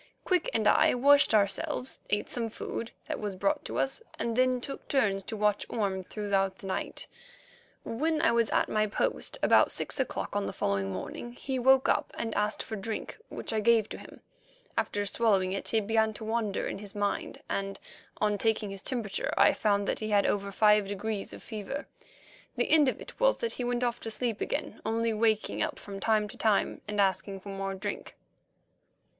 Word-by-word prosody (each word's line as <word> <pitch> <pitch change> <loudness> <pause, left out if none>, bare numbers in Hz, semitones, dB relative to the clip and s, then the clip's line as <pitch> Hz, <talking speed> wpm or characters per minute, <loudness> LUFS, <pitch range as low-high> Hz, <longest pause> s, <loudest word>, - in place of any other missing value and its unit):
Quick 365 -3 +2
and 220 -2 +1
I - - +5
washed 285 +3 +5
ourselves, 240 +6 +1
ate 205 - 0
some 230 -2 -2
food 230 +1 -5 0.2
that - - -3
was 205 -2 -3
brought 295 +10 0
to - - -4
us, 270 +10 0 0.2
and 230 -1 -1
then 255 0 +3
took 275 +3 -6
turns 205 -8 +2
to 220 - -3
watch 210 -1 +2
Orme 195 -4 -1
throughout 195 -1 -1
the 225 - -13
night. 190 - -3 0.8
When 310 +7 0
I - - +4
was 235 -2 +2
at - - +2
my 215 0 +1
post 205 - 0
about - - +5
six - - -1
o'clock - - -2
on 205 -1 0
the - - -4
following 100 -1 -1
morning 165 - -6
he 260 +1 -3
woke 265 +1 +5
up - - +1
and 225 -1 -2
asked 210 +1 0
for 220 - -5
drink, 215 - -5
which - - -4
I 220 - +1
gave 225 0 +4
to - - -7
him. - - -13 0.5
After 205 0 0
swallowing 195 -4 +2
it 195 - -3
he 225 - +3
began 220 +1 +1
to 220 - -7
wander 220 -2 -1
in - - -4
his 205 0 -10
mind, 205 0 -2
and, 195 0 -3 0.4
on 210 -1 +1
taking 220 -2 +1
his 195 -1 -5
temperature, 225 -7 0
I - - +6
found 205 -2 +1
that - - 0
he 215 - -3
had 205 -1 +3
over 200 0 0
five 210 0 +4
degrees 205 +1 -3
of - - -10
fever. 220 +6 -5 0.7
The - - 0
end 300 -4 +6
of - - -4
it - - -11
was - - +4
that 465 - -2
he 250 - -4
went 245 0 0
off 240 -1 0
to 225 - -5
sleep 225 -1 -2
again, - - -3
only 225 +1 0
waking 215 0 +1
up - - -1
from 195 -1 -8
time 215 0 +2
to - - -11
time 215 -3 +1
and 210 0 -3
asking 195 0 +1
for 200 - -9
more 195 0 -3
drink. 205 +2 -5
215 Hz, 200 wpm, -29 LUFS, 200-235 Hz, 0.8 s, I